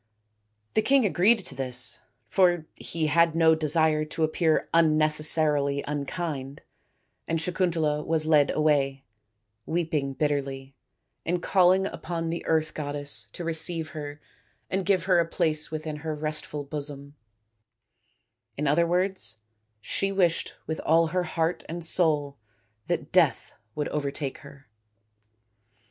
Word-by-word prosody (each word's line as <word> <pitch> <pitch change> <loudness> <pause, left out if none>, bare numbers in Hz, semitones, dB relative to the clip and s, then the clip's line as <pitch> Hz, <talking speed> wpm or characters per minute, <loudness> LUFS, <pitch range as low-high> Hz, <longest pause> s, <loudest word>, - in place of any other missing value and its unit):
The 215 - +3
king 265 +2 +3
agreed 200 +2 +3
to - - -3
this, 125 -2 -2 0.3
for 175 - +2
he 165 -1 -3
had 165 +1 +3
no 165 -1 +5
desire 155 0 +2
to 155 +1 -3
appear 155 0 +1
unnecessarily 155 -2 +4
unkind, 145 -1 -4 0.6
and 165 0 0
Sakuntala 165 -3 0
was 160 -1 0
led 150 -3 +4
away, 140 -3 +1 0.6
weeping 160 -5 -1
bitterly, 135 -1 -3 0.5
and 175 +1 -1
calling 185 0 +4
upon 165 -4 -4
the 170 - -4
earth 160 -1 +1
goddess 145 -6 -3
to 175 - -7
receive 165 0 -1
her 145 -1 -7 0.5
and 190 -1 -1
give 190 -4 +2
her 180 -1 +3
a 165 - +1
place 155 -2 0
within 155 -1 -5
her 155 +1 -4
restful 150 -1 -4
bosom 145 0 -7 1.4
in 150 - -2
other 170 +4 +3
words, 185 -5 -1 0.5
she 195 - -1
wished 175 -4 0
with 160 - -4
all 165 +1 +3
her 180 -1 0
heart 165 +1 -1
and 170 0 -5
soul 150 -6 +1 0.5
that - - -3
death - - +2 0.2
would 150 - -2
overtake 140 -1 -3
her. 140 -1 -15
155 Hz, 125 wpm, -26 LUFS, 145-170 Hz, 1.4 s, no